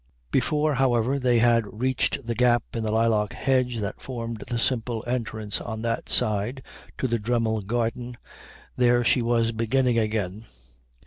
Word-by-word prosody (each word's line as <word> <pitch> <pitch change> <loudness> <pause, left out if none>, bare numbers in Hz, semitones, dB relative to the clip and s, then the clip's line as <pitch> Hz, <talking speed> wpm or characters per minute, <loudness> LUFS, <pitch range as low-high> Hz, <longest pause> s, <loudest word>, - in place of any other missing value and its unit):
Before, 150 +4 +1
however, 130 0 +1
they 125 -2 +3
had 115 -2 +2
reached 130 +1 0
the 120 - -1
gap 120 0 +3
in 115 - -2
the 110 - -1
lilac 110 -2 +1
hedge 125 -2 0
that 100 - -5
formed 115 -3 -5
the 120 - -2
simple 115 -1 -1
entrance 110 -4 -2
on 110 0 -5
that 115 0 -2
side 110 +5 +1 0.3
to 130 - -1
the 115 -1 0
Dremmel 110 -1 0
garden 120 +3 -3 0.6
there 120 -1 +3
she 120 - +3
was 115 -1 +1
beginning 115 +2 +1
again. 105 -1 -2
115 Hz, 150 wpm, -25 LUFS, 110-125 Hz, 0.6 s, they